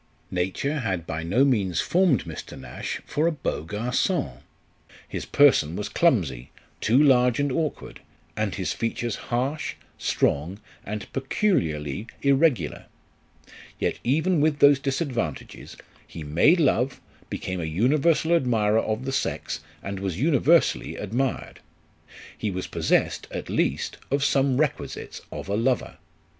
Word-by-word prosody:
Nature 95 Hz, +12 st, -1 dB
had 95 Hz, -9 st, -2 dB
by 80 Hz, -1 st, -4 dB
no 100 Hz, +12 st, +3 dB
means 100 Hz, -, +1 dB
formed 175 Hz, -6 st, +3 dB
Mr. 80 Hz, -2 st, -8 dB
Nash -, -, -5 dB
for 150 Hz, +2 st, 0 dB
a -, -, +2 dB
beau 145 Hz, -, -3 dB
gargon; 125 Hz, -, -1 dB, 0.7 s
his -, -, -5 dB
person 125 Hz, -, +4 dB
was 105 Hz, +1 st, -3 dB
clumsy, 90 Hz, -, +1 dB, 0.3 s
too 115 Hz, +4 st, +2 dB
large 125 Hz, -4 st, +5 dB
and 145 Hz, -1 st, +1 dB
awk 155 Hz, +2 st, -1 dB
ward, -, -, -11 dB, 0.4 s
and -, -, -1 dB
his -, -, -2 dB
features 115 Hz, 0 st, -2 dB
harsh, 130 Hz, +6 st, -1 dB, 0.2 s
strong, 85 Hz, +8 st, 0 dB, 0.2 s
and 105 Hz, 0 st, -5 dB
peculiarly 100 Hz, -, -1 dB, 0.2 s
irregular; 140 Hz, -, +2 dB, 0.9 s
yet -, -, -1 dB
even 160 Hz, +6 st, +2 dB
with 155 Hz, -1 st, +2 dB
those 140 Hz, -1 st, +6 dB
disadvantages, 135 Hz, -, -3 dB, 0.3 s
he 80 Hz, -, -8 dB
made 85 Hz, -, +4 dB
love, 135 Hz, -3 st, +2 dB, 0.3 s
became 95 Hz, -1 st, -4 dB
a -, -, -2 dB
universal 150 Hz, -, +2 dB
admirer 110 Hz, -8 st, +3 dB
of 110 Hz, +4 st, -3 dB
the 135 Hz, -, -2 dB
sex, 135 Hz, -, -2 dB, 0.2 s
and 100 Hz, -1 st, -4 dB
was 95 Hz, -2 st, -3 dB
universally 160 Hz, +3 st, +3 dB
admired. 120 Hz, +6 st, -2 dB, 0.8 s
He 110 Hz, -, -3 dB
was 95 Hz, -1 st, -3 dB
possessed, -, -, 0 dB
at -, -, -6 dB
least, -, -, 0 dB
of 140 Hz, 0 st, +1 dB
some 135 Hz, -2 st, +2 dB
requisites 150 Hz, -1 st, -2 dB
of -, -, -6 dB
a 100 Hz, -, -1 dB
lover. 120 Hz, +3 st, 0 dB
125 Hz, 135 wpm, -25 LUFS, 95-145 Hz, 0.9 s, those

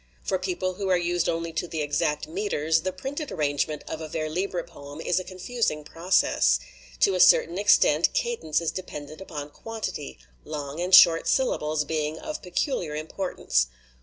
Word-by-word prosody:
For 190 Hz, -, 0 dB
people 185 Hz, 0 st, -2 dB
who 195 Hz, +1 st, -3 dB
are 185 Hz, -, +4 dB
used 175 Hz, 0 st, 0 dB
only 165 Hz, 0 st, -2 dB
to 160 Hz, +2 st, -2 dB
the 160 Hz, -2 st, -3 dB
exact 145 Hz, 0 st, -1 dB
meters, 165 Hz, -, 0 dB
the 185 Hz, +3 st, -2 dB
printed 270 Hz, -, -5 dB
arrangement 150 Hz, -1 st, -1 dB
of 160 Hz, -, -5 dB
a 160 Hz, -, -5 dB
vers 155 Hz, 0 st, -3 dB
libre 185 Hz, -2 st, -1 dB
poem 145 Hz, -3 st, -11 dB
is 175 Hz, +2 st, +1 dB
a -, -, -5 dB
confusing 185 Hz, -3 st, -2 dB
process. 155 Hz, -, +2 dB, 0.4 s
To 195 Hz, -, +5 dB
a 185 Hz, -, 0 dB
cer -, -, +7 dB
tain 170 Hz, +3 st, -6 dB
extent 175 Hz, -6 st, +4 dB
cadence 170 Hz, -11 st, 0 dB
is 165 Hz, -, -1 dB
dependent 155 Hz, -3 st, -7 dB
upon 150 Hz, -5 st, -7 dB
quantity 220 Hz, -, -6 dB, 0.3 s
long 150 Hz, 0 st, -6 dB
and 180 Hz, +1 st, +6 dB
short 165 Hz, -1 st, +7 dB
syllables 155 Hz, -, +1 dB
being 155 Hz, 0 st, -2 dB
of 305 Hz, -, -6 dB
peculiar 180 Hz, -, -2 dB
impor 180 Hz, +5 st, -4 dB
tance. -, -, +2 dB
170 Hz, 175 wpm, -26 LUFS, 150-185 Hz, 0.4 s, cer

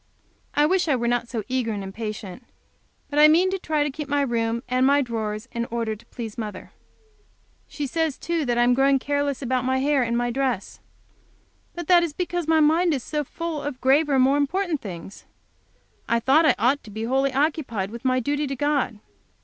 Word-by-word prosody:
I 295 Hz, -, +4 dB
wish 365 Hz, +2 st, +2 dB
I 290 Hz, -, +3 dB
were 240 Hz, -1 st, -1 dB
not 240 Hz, 0 st, 0 dB
so 225 Hz, -4 st, -3 dB
eager 255 Hz, -3 st, -1 dB
and 200 Hz, -1 st, -4 dB
impatient. 210 Hz, +1 st, -6 dB, 0.7 s
But 290 Hz, -, +1 dB
I 300 Hz, -, +9 dB
mean 350 Hz, +5 st, +4 dB
to 385 Hz, -, -2 dB
try 305 Hz, -3 st, 0 dB
to 295 Hz, -, -2 dB
keep 295 Hz, +1 st, -6 dB
my 285 Hz, 0 st, +2 dB
room 235 Hz, -2 st, -1 dB
and 255 Hz, +1 st, +1 dB
my 280 Hz, +2 st, +4 dB
drawers 220 Hz, -1 st, -4 dB
in 235 Hz, 0 st, -2 dB
order, 230 Hz, -2 st, -3 dB
to 215 Hz, -, -18 dB
please 225 Hz, -2 st, -7 dB
mother. 210 Hz, -4 st, -6 dB, 1.0 s
She 295 Hz, -, -4 dB
says, 320 Hz, +1 st, -1 dB
too, 335 Hz, -2 st, -2 dB
that 240 Hz, -1 st, 0 dB
I 240 Hz, -, +4 dB
am 245 Hz, +1 st, +4 dB
growing 270 Hz, +2 st, +4 dB
careless 285 Hz, 0 st, -1 dB
about 255 Hz, 0 st, 0 dB
my 260 Hz, +1 st, +1 dB
hair 280 Hz, +1 st, +2 dB
and 235 Hz, -1 st, 0 dB
my 240 Hz, 0 st, 0 dB
dress. 255 Hz, -5 st, -2 dB, 1.0 s
But 345 Hz, -2 st, -6 dB
that 355 Hz, -1 st, +6 dB
is 335 Hz, -3 st, -2 dB
because 350 Hz, -1 st, -3 dB
my 320 Hz, 0 st, +4 dB
mind 320 Hz, +2 st, +3 dB
is 260 Hz, -, -5 dB
so 300 Hz, -1 st, -2 dB
full 330 Hz, +1 st, -5 dB
of 285 Hz, -3 st, -5 dB
graver, 275 Hz, +2 st, +3 dB
more 265 Hz, +2 st, +4 dB
important 320 Hz, +2 st, 0 dB
things. 190 Hz, 0 st, -9 dB, 0.8 s
I 235 Hz, -, +3 dB
thought 285 Hz, +7 st, +4 dB
I -, -, +4 dB
ought 255 Hz, +6 st, +1 dB
to -, -, -11 dB
be 220 Hz, +2 st, -5 dB
wholly 265 Hz, +3 st, +1 dB
occupied 270 Hz, -, -1 dB
with 235 Hz, 0 st, -8 dB
my 255 Hz, -1 st, +2 dB
duty 290 Hz, +4 st, -1 dB
to 275 Hz, -, -3 dB
God. 285 Hz, -4 st, 0 dB
265 Hz, 205 wpm, -24 LUFS, 235-295 Hz, 1.0 s, I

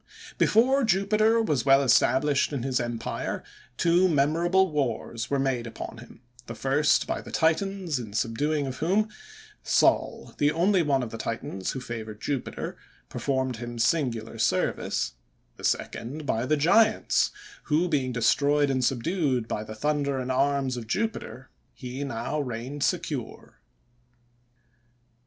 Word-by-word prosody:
Before 260 Hz, +5 st, +4 dB
Jupiter 215 Hz, +2 st, +3 dB
was 150 Hz, -, 0 dB
well 135 Hz, 0 st, +5 dB
established 135 Hz, +3 st, +3 dB
in 135 Hz, -5 st, -3 dB
his 130 Hz, -1 st, 0 dB
empire, 120 Hz, -1 st, -3 dB, 0.3 s
two 175 Hz, +2 st, +3 dB
memorable 170 Hz, +5 st, +2 dB
wars 120 Hz, -5 st, -2 dB
were 140 Hz, -, +1 dB
made 130 Hz, -3 st, -1 dB
upon 115 Hz, 0 st, -8 dB
him; 120 Hz, 0 st, -14 dB, 0.3 s
the 115 Hz, -, -6 dB
first 135 Hz, +6 st, +2 dB
by -, -, -3 dB
the -, -, -11 dB
Titans, 170 Hz, -1 st, 0 dB
in 110 Hz, -4 st, -8 dB
subduing 140 Hz, +7 st, 0 dB
of 130 Hz, -1 st, -5 dB
whom, 200 Hz, +7 st, +1 dB, 0.5 s
Sol, -, -, +1 dB
the 145 Hz, 0 st, +3 dB
only 180 Hz, +4 st, +3 dB
one 140 Hz, -5 st, +1 dB
of 115 Hz, -, -6 dB
the 115 Hz, -, -7 dB
Titans 95 Hz, -5 st, -4 dB
who 135 Hz, -, -4 dB
favored 110 Hz, -4 st, -7 dB
Jupiter, 135 Hz, +2 st, -4 dB, 0.3 s
performed 130 Hz, -3 st, -1 dB
him 120 Hz, +1 st, -6 dB
singular 115 Hz, -4 st, 0 dB
service; 95 Hz, -4 st, 0 dB, 0.4 s
the -, -, -13 dB
second 145 Hz, +6 st, -2 dB
by 115 Hz, -1 st, -1 dB
the 155 Hz, -, +2 dB
giants, 215 Hz, +9 st, +3 dB, 0.4 s
who 160 Hz, +3 st, +2 dB
being 135 Hz, -6 st, 0 dB
destroyed 140 Hz, +4 st, +2 dB
and 130 Hz, -1 st, 0 dB
subdued 130 Hz, -1 st, 0 dB
by 105 Hz, -, -3 dB
the 110 Hz, 0 st, -8 dB
thunder 145 Hz, +2 st, 0 dB
and 130 Hz, 0 st, -2 dB
arms 135 Hz, -1 st, +1 dB
of 115 Hz, -2 st, -7 dB
Jupiter, 135 Hz, -, -3 dB, 0.2 s
he 130 Hz, +2 st, -6 dB
now 140 Hz, +3 st, -3 dB
reigned 130 Hz, +2 st, -4 dB
secure. 155 Hz, -9 st, -3 dB
135 Hz, 140 wpm, -26 LUFS, 120-160 Hz, 0.5 s, well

